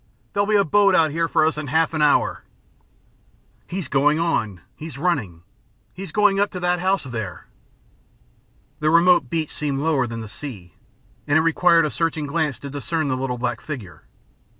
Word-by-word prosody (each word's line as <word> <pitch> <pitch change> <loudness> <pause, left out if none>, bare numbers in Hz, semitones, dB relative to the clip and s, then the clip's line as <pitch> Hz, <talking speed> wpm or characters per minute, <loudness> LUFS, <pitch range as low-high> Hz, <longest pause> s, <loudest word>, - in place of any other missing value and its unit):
There'll 200 0 +1
be 215 - +2
a 200 -1 +4
boat 200 +3 +4
out 160 -2 +3
here 165 +2 0
for 155 - +2
us 155 -1 0
in 150 - -5
half 160 +4 +1
an 155 - -1
hour." 150 -1 +2 1.2
"He's 180 -4 -4
going 145 +3 +2
on. 110 - -1
He's 160 -2 -8
running. 125 - -2 0.5
He's 190 -2 -8
going 205 0 +3
up 205 0 +2
to 180 - -4
that 180 0 0
house 190 +2 +1
there." 110 - -6 1.3
The 155 - +1
remote 170 -4 +4
beach 160 0 -2
seemed 145 -2 -2
lower 140 -3 +1
than 115 0 -6
the 110 - -7
sea, 105 -7 -9 0.5
and 145 - +3
it - - +4
required 165 +1 +4
a 150 - -2
searching 165 -2 -1
glance 150 -2 -1
to 140 - -7
discern 145 +2 -2
the 130 - 0
little 130 -1 -3
black 120 -1 -3
figure. 125 - -8
155 Hz, 180 wpm, -22 LUFS, 130-170 Hz, 1.3 s, a